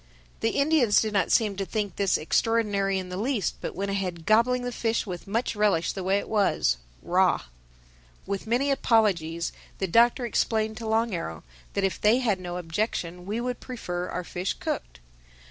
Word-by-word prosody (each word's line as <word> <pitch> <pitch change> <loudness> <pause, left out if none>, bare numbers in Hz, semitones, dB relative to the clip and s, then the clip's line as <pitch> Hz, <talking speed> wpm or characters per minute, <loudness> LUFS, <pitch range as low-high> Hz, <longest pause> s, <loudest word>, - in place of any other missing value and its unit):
The 225 - 0
Indians 280 -7 +4
did 215 -1 -1
not 195 -4 +1
seem 215 -4 +3
to 195 - -1
think 205 0 -3
this 200 -2 +2
extraordinary 200 +1 +1
in 185 -1 -4
the 180 - -5
least, 225 -2 -1
but - - -4
went 200 +2 -2
ahead 180 -4 -3
gobbling 240 +4 +3
the 245 - -2
fish 230 -1 -1
with 180 -4 -6
much 225 +4 -1
relish 205 -5 +2
the 190 - -5
way 190 +2 +2
it 200 - -4
was, 195 - +2 0.3
raw. - - +2 0.8
With 200 +2 -4
many 255 +5 +2
apologies, 180 -10 +2 0.3
the 195 - -1
Doctor 235 +6 +4
explained 220 -2 0
to 230 - -5
Long 225 0 +1
Arrow 80 - -4 0.3
that 200 - 0
if 195 - -1
they 215 +3 +5
had 220 -7 +1
no 175 -1 -5
objection 180 0 -3
we 215 +3 -2
would 250 0 -3
prefer 180 -8 -5
our 180 - -3
fish 180 +2 -3
cooked. - - -5
205 Hz, 180 wpm, -26 LUFS, 180-230 Hz, 0.8 s, they